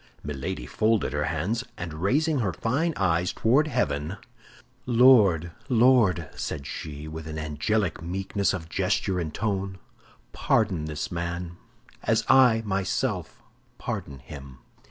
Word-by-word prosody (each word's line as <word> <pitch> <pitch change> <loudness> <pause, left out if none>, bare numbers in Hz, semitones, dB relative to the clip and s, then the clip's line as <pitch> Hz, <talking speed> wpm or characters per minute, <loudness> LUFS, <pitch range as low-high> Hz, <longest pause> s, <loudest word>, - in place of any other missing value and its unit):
Milady 70 -4 -4
folded 110 - +1
her 75 0 0
hands, 90 +10 -1
and 85 -3 -5
raising 140 - +1
her 100 -7 0
fine 140 - 0
eyes 90 -2 +1
toward 135 +7 +3
heaven, 75 - -1 0.7
"Lord, 110 -9 +5 0.2
Lord," 115 - +4
said 70 -3 -4
she, 75 +1 -6
with 80 0 -7
an 80 0 -5
angelic 80 +4 -1
meekness 95 +3 -1
of 85 -4 -5
gesture 90 +3 0
and 80 -3 -3
tone, 95 -1 -2 0.6
"pardon 95 -9 +1
this 75 -1 -4
man, 85 0 -4 0.4
as - - +1
I 125 -3 +5
myself 95 -2 -2 0.3
pardon 70 - -5
him." 65 0 -11
90 Hz, 125 wpm, -26 LUFS, 75-110 Hz, 0.7 s, Lord